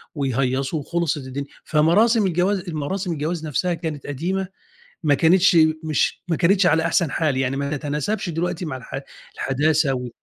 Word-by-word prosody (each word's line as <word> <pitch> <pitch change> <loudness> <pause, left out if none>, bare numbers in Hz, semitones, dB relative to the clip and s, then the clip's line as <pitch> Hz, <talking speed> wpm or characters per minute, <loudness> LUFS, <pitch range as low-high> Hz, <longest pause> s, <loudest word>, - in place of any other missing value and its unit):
ويهيصوا 135 +2 -1
وخلصت 170 +1 -1
الدنيا، 140 +1 -6 0.2
فمراسم 205 +9 +3
الجواز 185 +2 +1
المراسم 175 +2 -3
الجواز 160 +2 -3
نَفْسها 175 +5 0
كانت 160 -4 -5
قديمة، 180 +7 -2 0.6
ما 145 -2 +3
كانتش 175 +4 +4 0.3
مش 155 -2 0
ما 165 - +1
كانتش 185 +3 +3
على 160 -1 +3
أحسن 165 -6 +1
حال 155 -5 0
يعني، 130 0 0
ما 140 +1 -2
تتناسبش 150 +9 -2
دلوقتي 170 +2 -2
مع 145 -5 -4
الح 130 +2 -7 0.4
الحداثة 145 +1 +1
و. 125 -1 -4
155 Hz, 155 wpm, -22 LUFS, 140-175 Hz, 0.6 s, كانتش